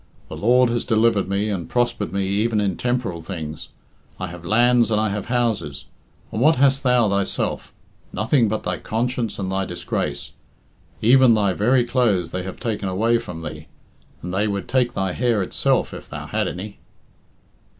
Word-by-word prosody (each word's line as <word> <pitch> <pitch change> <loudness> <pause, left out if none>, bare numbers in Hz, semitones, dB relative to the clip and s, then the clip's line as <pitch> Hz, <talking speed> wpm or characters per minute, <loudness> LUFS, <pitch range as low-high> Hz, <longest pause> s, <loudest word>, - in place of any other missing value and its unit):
The - - -6
Lord 125 +3 +4
has 120 - 0
delivered 110 -3 +2
me, 100 +2 0
and 90 -5 -4
prospered 120 -8 0
me 100 +1 -1
even 105 +3 +1
in 100 -3 0
temporal 120 -9 -2
things. 80 -3 -6 0.5
I 95 - -2
have 85 0 -10
lands 120 +5 +3
and 105 -1 +2
I 110 0 +1
have 100 0 -4
houses. 115 - -1 0.5
And 110 - -3
what 155 +4 +5
hast 135 +1 +3
thou 125 -4 +3
thyself? 100 -1 -1 0.4
Nothing 115 +2 +2
but 110 +1 -2
thy 90 0 -2
conscience 120 0 -2
and 95 -2 -3
thy 95 0 0
disgrace. 85 -2 -3 0.7
Even 125 0 +6
thy 100 -3 +2
very 120 +6 +3
clothes 110 -9 +1
they 90 - -3
have 95 0 -7
taken 105 -5 -2
away 115 +5 +2
from 90 -8 -8
thee, 75 0 -7 0.6
and 90 +1 -5
they 100 +3 +1
would 100 -2 -3
take 125 -2 +1
thy 95 -4 -1
hair 120 -4 +1
itself - - 0
if - - -10
thou - - -6
had - - -1
any." 100 +3 -7
105 Hz, 175 wpm, -22 LUFS, 95-120 Hz, 0.7 s, Even